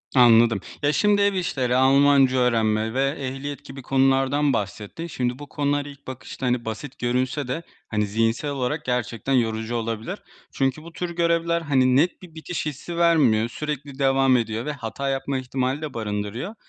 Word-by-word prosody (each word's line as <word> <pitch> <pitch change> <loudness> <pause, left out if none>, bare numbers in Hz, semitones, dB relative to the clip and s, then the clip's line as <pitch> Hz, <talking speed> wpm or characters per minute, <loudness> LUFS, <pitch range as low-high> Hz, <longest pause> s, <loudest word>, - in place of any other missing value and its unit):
Anladım, 115 -3 +6 0.2
ya, 145 +1 +3
şimdi 205 -1 +3
ev 200 0 +3
işleri, 130 -9 0
Almanca 135 0 +5
öğrenme 110 -2 +1
ve 135 +1 +2
ehliyet 140 +2 -5
gibi 135 0 -9
konulardan 135 +2 +2
bahsettin. 105 - -4
Şimdi, 125 -3 -2
bu 145 -2 -9
konular 145 -1 0
ilk 140 -1 -12
bakışta, 130 0 -7
hani, 125 -2 0
basit 120 +5 -6
görünse 125 +3 -1
de, 165 +7 -3 0.3
hani, 105 -1 0
zihinsel 115 +7 0
olarak 140 +3 -2
gerçekten 125 +1 -1
yorucu 115 -1 0
olabilir. 115 -1 -3 0.3
Çünkü 135 +3 -1
bu 170 0 -11
tür 180 -1 -3
görevler, 170 0 +1
hani, 130 -4 +3
net 170 +7 +2
bir 170 -3 -14
bitiş 160 +1 -4
hissi 155 +4 -5
vermiyor, 135 -10 +4
sürekli 145 -1 -5
devam 135 -1 +4
ediyor 115 +1 -2
ve 150 - -2
hata 135 +1 -4
yapma 135 0 -1
ihtimali 130 +2 -2
de 150 -3 -5
barındırıyor. 110 - -4
135 Hz, 165 wpm, -24 LUFS, 120-145 Hz, 0.3 s, Anladım